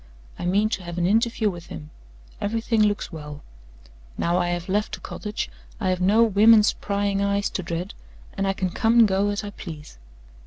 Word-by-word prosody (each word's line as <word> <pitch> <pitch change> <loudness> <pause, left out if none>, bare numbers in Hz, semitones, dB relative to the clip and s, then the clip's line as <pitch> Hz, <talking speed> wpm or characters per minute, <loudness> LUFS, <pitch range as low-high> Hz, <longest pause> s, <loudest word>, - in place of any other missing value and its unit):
I 175 - -2
mean 200 +4 +3
to 210 - -3
have 175 -1 -7
an 175 - +1
interview 225 +3 +2
with 175 -1 -10
him. 75 -1 -9 0.5
Everything 225 +1 0
looks 210 -1 +1
well. 150 -2 -8 0.7
Now 170 +1 +1
I 175 - 0
have 175 0 -3
left 205 +2 -1
the - - -15
cottage, 210 0 -5 0.3
I 190 -4 0
have 185 0 0
no 210 +5 +5
women's 215 0 +5
prying 200 -1 -1
eyes 200 0 0
to - - -3
dread, 170 +2 -4 0.4
and 195 0 -1
I 195 - +1
can 185 -2 -2
come 230 +4 +2
and 230 -2 +7
go 195 +1 +1
as 205 +1 -2
I 205 - -6
please. 155 - -10
200 Hz, 195 wpm, -24 LUFS, 175-210 Hz, 0.7 s, and